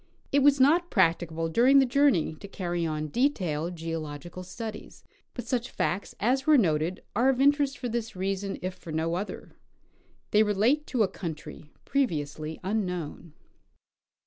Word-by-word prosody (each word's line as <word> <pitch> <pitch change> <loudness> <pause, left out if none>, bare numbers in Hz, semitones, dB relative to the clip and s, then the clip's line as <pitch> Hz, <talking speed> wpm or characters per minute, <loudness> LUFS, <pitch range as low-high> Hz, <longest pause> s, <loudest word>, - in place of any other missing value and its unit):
It 285 - +4
was 280 0 +5
not 335 +6 +4
practicable 165 -3 +1
during 245 +11 +5
the 270 - +6
journey 260 - +3
to - - -9
carry 175 -3 -2
on 155 -1 -3
detailed 175 - 0
geological 165 +1 -6
studies, 215 +4 -8 0.3
but 245 - -5
such 245 0 -1
facts 185 +3 -2
as 260 +6 +1
were 305 -1 +7
noted 170 - +1
are 255 +3 +4
of 260 -1 +1
interest, 285 0 +3
for 250 - -4
this 230 -2 -3
reason, 195 +1 -2
if 185 0 -2
for 170 - -10
no 160 +1 -1
other: 190 +4 -5 0.8
they 210 - +5
relate 220 +8 +2
to 245 -5 +2
a - - +2
country 160 -4 -7 0.2
previously 155 - -2
unknown. 180 -5 -3
195 Hz, 150 wpm, -28 LUFS, 165-255 Hz, 0.8 s, were